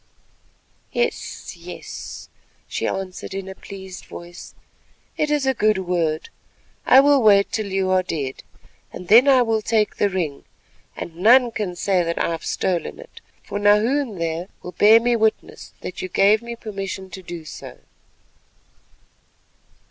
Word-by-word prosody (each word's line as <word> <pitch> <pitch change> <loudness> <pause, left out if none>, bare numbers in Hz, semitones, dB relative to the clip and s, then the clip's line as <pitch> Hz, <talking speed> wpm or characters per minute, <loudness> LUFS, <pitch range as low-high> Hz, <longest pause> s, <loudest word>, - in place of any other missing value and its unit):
"Yes, 480 - -3
yes," - - -9 0.4
she - - -2
answered 190 0 -5
in 195 -1 -5
a 190 - -6
pleased 190 -1 -10
voice, 175 0 -11 0.6
"it 300 - 0
is 295 -2 +1
a 265 - +2
good 215 -4 +2
word. 175 -4 -1 0.6
I 260 - +8
will 285 -1 +4
wait 200 -3 +5
till 210 -2 -3
you 190 -1 0
are 185 0 +4
dead 145 -7 -4 0.5
and 180 - -10
then 240 +6 +7
I 260 -3 +6
will 225 -2 0
take 215 -1 0
the 205 - +2
ring, 170 -7 -3 0.5
and 165 -1 -7
none 240 +6 +5
can 200 -5 -3
say 185 +1 +1
that 170 0 -2
I - - 0
have 165 -1 -4
stolen 180 -3 -2
it, - - -14 0.2
for 205 - -5
Nahoon 215 +3 +2
there 165 +1 -3 0.2
will 180 - -7
bear 215 +4 +6
me 240 +1 +1
witness 220 -1 -1
that 185 - -6
you 185 - -5
gave 200 +4 +4
me 235 0 -7
permission 195 -4 -6
to 190 - -8
do 170 -2 -8
so." - - -10
195 Hz, 155 wpm, -22 LUFS, 180-225 Hz, 0.6 s, I